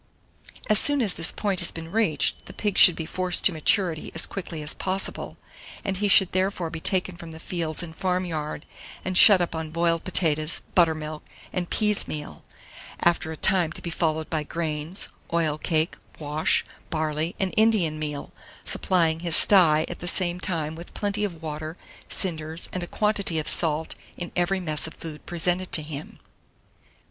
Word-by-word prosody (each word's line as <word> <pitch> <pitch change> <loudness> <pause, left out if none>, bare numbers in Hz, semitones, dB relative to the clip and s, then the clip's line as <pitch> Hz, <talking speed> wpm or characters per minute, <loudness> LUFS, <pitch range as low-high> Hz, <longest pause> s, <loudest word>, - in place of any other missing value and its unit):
As 215 -1 +5
soon 290 -1 +5
as 215 -7 +1
this 165 - +1
point 200 -3 -1
has 175 - +5
been 165 0 -9
reached, 190 - 0
the - - -10
pig 205 -3 -2
should 180 - +8
be 160 - -5
forced 180 +2 +2
to - - +7
maturity 165 0 0
as 160 - +1
quickly 170 -5 -7
as 150 - -4
possible; 190 +1 -3 0.5
he 195 +1 -1
should 190 -2 +7
therefore 185 -3 -1
be 165 - -6
taken 185 +1 +2
from 170 -1 -10
the 160 0 -11
fields 165 -1 -3
and 160 -2 -9
farm 185 0 -1
yard, 155 -3 -5 0.4
and 185 - -3
shut 195 0 +9
up 175 - -2
on 160 -1 -5
boiled 165 +1 0
potatoes, 160 -3 0
buttermilk, 155 -3 +1 0.3
and 180 -2 -3
peas 210 -2 +1
meal, 150 - -8 0.6
after 170 -2 +1
a 160 - -7
time 180 -3 +2
to - - -5
be 170 - -5
followed 160 -1 -1
by 160 -2 -2
grains, 155 +3 -4 0.2
oil 160 -3 0
cake, 160 0 0 0.2
wash, 150 +1 0 0.2
barley, 155 +1 -2
and 190 -1 -1
Indian 210 -9 +2
meal; 150 -2 -5 0.3
supplying 165 -3 +1
his 170 -1 +1
sty 160 -6 +5
at - - -7
the 175 - -6
same 175 -1 +2
time 160 -4 -3
with 170 +2 -12
plenty 205 0 -1
of 170 -6 -5
water, 155 +2 -6 0.3
cinders, 160 -3 -3
and 185 - -3
a 175 - -5
quantity 210 -5 0
of 155 - -2
salt 160 -1 +1 0.2
in 175 - -6
every 180 +2 0
mess 155 -3 0
of 160 - -11
food 155 -2 -10
presented 175 +2 0
to 155 - +7
him. 150 -1 -8
170 Hz, 175 wpm, -24 LUFS, 155-185 Hz, 0.6 s, shut